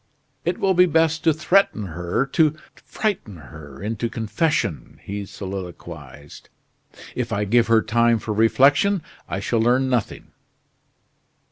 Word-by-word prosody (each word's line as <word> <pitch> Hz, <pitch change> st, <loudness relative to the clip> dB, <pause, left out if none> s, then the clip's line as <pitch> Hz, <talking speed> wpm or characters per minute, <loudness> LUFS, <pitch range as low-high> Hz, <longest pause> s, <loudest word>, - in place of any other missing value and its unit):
"It 175 Hz, +1 st, 0 dB
will 190 Hz, -1 st, +2 dB
be 180 Hz, 0 st, +5 dB
best 160 Hz, -1 st, +1 dB
to 165 Hz, -, +6 dB
threaten 155 Hz, -, +2 dB
her, 85 Hz, -, -2 dB
to 155 Hz, +2 st, +2 dB, 0.2 s
frighten 185 Hz, -, -4 dB
her 75 Hz, -1 st, -12 dB
into 115 Hz, +2 st, -2 dB
confession," 115 Hz, -, -2 dB
he 100 Hz, 0 st, -5 dB
soliloquized. 85 Hz, -8 st, -9 dB, 0.6 s
"If -, -, -3 dB
I 105 Hz, +1 st, 0 dB
give 120 Hz, +3 st, +3 dB
her 115 Hz, -1 st, +4 dB
time 115 Hz, +1 st, +3 dB
for 110 Hz, -1 st, -4 dB
reflection, 140 Hz, -, +3 dB, 0.3 s
I 95 Hz, -, -2 dB
shall 115 Hz, +3 st, -1 dB
learn 125 Hz, +3 st, +2 dB
nothing." 120 Hz, -5 st, -2 dB
115 Hz, 130 wpm, -22 LUFS, 95-155 Hz, 0.6 s, to